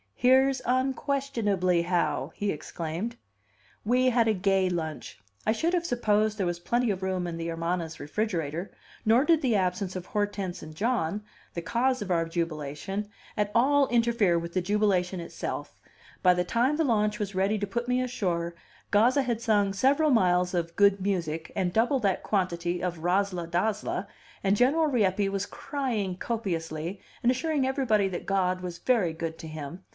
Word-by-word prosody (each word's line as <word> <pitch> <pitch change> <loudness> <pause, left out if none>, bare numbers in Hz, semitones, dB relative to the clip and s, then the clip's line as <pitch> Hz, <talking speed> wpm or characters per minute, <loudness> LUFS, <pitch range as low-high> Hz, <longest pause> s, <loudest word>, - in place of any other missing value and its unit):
"Here's 260 +1 +4
unquestionably 250 - +1
how!" 155 -5 0
he 205 -1 -1
exclaimed. 165 +8 -5 0.7
We 250 +3 +3
had 230 -1 +3
a 220 - +3
gay 190 0 +2
lunch; 160 -9 -4 0.3
I - - +5
should 325 +10 0
have 345 -1 +1
supposed 215 -5 +1
there 195 - 0
was 175 -1 -2
plenty 240 +6 +1
of 190 -1 -3
room 185 -1 -1
in 170 -1 -4
the 165 0 -4
Hermana's 165 0 -3
refrigerator; 170 0 -2 0.3
nor 235 +6 +4
did 330 -2 +4
the 245 -5 +2
absence 185 0 0
of 180 -1 -5
Hortense 205 -3 -2
and 155 0 -10
John, 210 -2 0 0.3
the 170 - -2
cause 255 +6 +1
of 190 - -5
our 165 -1 +2
jubilation, 165 +4 -3 0.3
at 210 0 0
all 275 +3 +4
interfere 230 -7 +2
with 170 0 -4
the 185 - +1
jubilation 190 -2 +1
itself; 170 - -6 0.4
by 180 -1 +5
the 180 - +1
time 245 +10 +1
the 325 - +2
launch 210 -5 +1
was 200 -2 -4
ready 195 +3 +2
to 205 0 -2
put 235 +4 -3
me 250 0 +2
ashore, 180 -9 -2 0.4
Gazza 245 +7 +4
had 235 -3 -2
sung 205 -3 +2
several 280 +8 +3
miles 180 -5 +3
of 170 -1 -2
"good 200 0 +4
music" 170 -5 -2
and 180 -3 0
double 240 +5 +2
that 195 -4 +1
quantity 175 -3 -1
of 175 -2 -2
"razzla 180 0 0
dazzla," 200 +5 -1 0.4
and 195 0 +3
General 275 +8 +3
Rieppe 205 -7 +2
was 195 0 -2
crying 235 -10 -3
copiously, 175 -5 -3 0.2
and 240 - +5
assuring 285 +1 0
everybody 230 -7 +2
that 180 -2 -5
God 185 -2 +1
was 175 -2 -5
very 220 -10 +2
good 160 0 -4
to 160 - -7
him. 155 +3 -7
195 Hz, 170 wpm, -28 LUFS, 175-235 Hz, 0.7 s, I